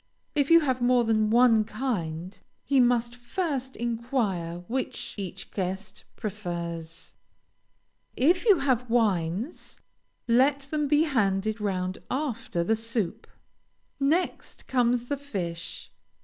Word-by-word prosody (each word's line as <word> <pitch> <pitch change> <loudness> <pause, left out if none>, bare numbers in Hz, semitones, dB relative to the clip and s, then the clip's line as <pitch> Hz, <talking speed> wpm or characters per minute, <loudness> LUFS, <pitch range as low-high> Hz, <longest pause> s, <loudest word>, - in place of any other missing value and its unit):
If 285 -2 +1
you 335 0 +8
have 260 -4 0
more 245 0 +4
than 215 -1 +2
one 230 -1 +5
kind, 200 -7 -3 0.3
he 275 -2 +2
must 240 -1 +3
first 260 +1 -3
inquire 225 -8 -2
which 260 +2 -3
each 195 -4 -6
guest 190 +1 -4
prefers. 170 -6 -5 1.0
If 340 +8 +4
you 405 -4 +7
have 250 -4 0
wines, 210 - 0 0.5
let 265 +4 +4
them 295 +2 -2
be 295 +2 +4
handed 215 -6 0
round 185 -2 -2
after 235 - -2
the 225 +6 +2
soup. 225 -1 -3 0.7
Next 310 +6 -1
comes 245 -1 +2
the 285 - -1
fish. 180 -12 -5
235 Hz, 115 wpm, -27 LUFS, 195-265 Hz, 1.0 s, you